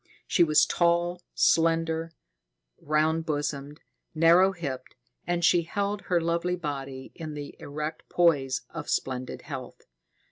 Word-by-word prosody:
She 175 Hz, -, +3 dB
was 155 Hz, -2 st, +5 dB
tall, 175 Hz, +1 st, +1 dB
slender, 165 Hz, 0 st, +2 dB, 0.7 s
round 155 Hz, +2 st, +1 dB
bosomed, 145 Hz, -1 st, -3 dB, 0.3 s
narrow 170 Hz, +4 st, +6 dB
hipped, 140 Hz, -8 st, -6 dB, 0.3 s
and 175 Hz, -1 st, +1 dB
she 175 Hz, 0 st, +5 dB
held 200 Hz, +4 st, -2 dB
her 175 Hz, -2 st, +2 dB
lovely 170 Hz, +2 st, 0 dB
body 135 Hz, -5 st, -6 dB
in 155 Hz, -2 st, -7 dB
the 145 Hz, -1 st, -7 dB
erect 150 Hz, +2 st, -6 dB
poise 145 Hz, -7 st, +2 dB
of -, -, -6 dB
splendid 130 Hz, -1 st, -2 dB
health. 135 Hz, -4 st, -8 dB
160 Hz, 120 wpm, -27 LUFS, 145-170 Hz, 0.7 s, narrow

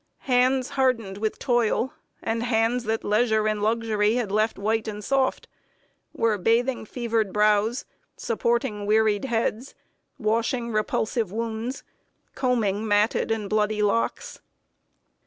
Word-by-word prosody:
Hands 255 Hz, 0 st, +2 dB
hardened 230 Hz, -7 st, 0 dB
with 215 Hz, 0 st, -2 dB
toil, 240 Hz, +2 st, +1 dB, 0.3 s
and 225 Hz, 0 st, -1 dB
hands 235 Hz, +1 st, +1 dB
that 220 Hz, +1 st, -1 dB
leisure 215 Hz, 0 st, +2 dB
and 215 Hz, -1 st, -1 dB
luxury 220 Hz, 0 st, +1 dB
left 215 Hz, +2 st, 0 dB
white 220 Hz, +2 st, -1 dB
and 210 Hz, -1 st, -5 dB
soft, 270 Hz, +2 st, 0 dB, 0.6 s
were 220 Hz, -3 st, 0 dB
bathing 235 Hz, +4 st, +1 dB
fevered 225 Hz, -3 st, -1 dB
brows, 210 Hz, +4 st, +2 dB, 0.3 s
supporting 225 Hz, -3 st, -1 dB
wearied 215 Hz, 0 st, +2 dB
heads, 235 Hz, 0 st, -2 dB, 0.4 s
washing 230 Hz, +1 st, 0 dB
repulsive 215 Hz, 0 st, -1 dB
wounds, 230 Hz, +3 st, -4 dB, 0.5 s
combing 220 Hz, -5 st, 0 dB
matted 210 Hz, +2 st, +2 dB
and 220 Hz, -2 st, -1 dB
bloody 210 Hz, 0 st, +1 dB
locks. 230 Hz, -, -1 dB
225 Hz, 115 wpm, -25 LUFS, 210-240 Hz, 0.6 s, Hands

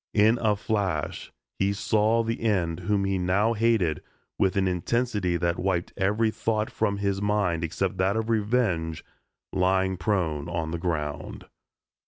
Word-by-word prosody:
In 110 Hz, +3 st, +5 dB
a 110 Hz, -2 st, +3 dB
flash 100 Hz, -7 st, -2 dB, 0.3 s
he 100 Hz, +1 st, +2 dB
saw 110 Hz, +3 st, +2 dB
the 115 Hz, +1 st, -3 dB
end 90 Hz, -7 st, 0 dB
whom 100 Hz, +2 st, 0 dB
he 95 Hz, -1 st, 0 dB
now 100 Hz, +6 st, +2 dB
hated 110 Hz, -8 st, +1 dB, 0.4 s
with 95 Hz, -, +2 dB
an 95 Hz, -1 st, +2 dB
intensity 95 Hz, 0 st, 0 dB
that 85 Hz, -1 st, -1 dB
wiped 90 Hz, -2 st, -1 dB
every 105 Hz, +3 st, +1 dB
thought 110 Hz, -1 st, -1 dB
from 100 Hz, 0 st, 0 dB
his 100 Hz, -1 st, -1 dB
mind 100 Hz, -5 st, +1 dB
except 90 Hz, +3 st, -2 dB
that 95 Hz, +3 st, +1 dB
of 110 Hz, 0 st, -1 dB
revenge, 105 Hz, -8 st, 0 dB, 0.5 s
lying 95 Hz, 0 st, +2 dB
prone 85 Hz, -5 st, -1 dB
on 80 Hz, -2 st, -2 dB
the 85 Hz, -, -3 dB
ground. 75 Hz, -4 st, -3 dB
95 Hz, 150 wpm, -26 LUFS, 85-105 Hz, 0.5 s, In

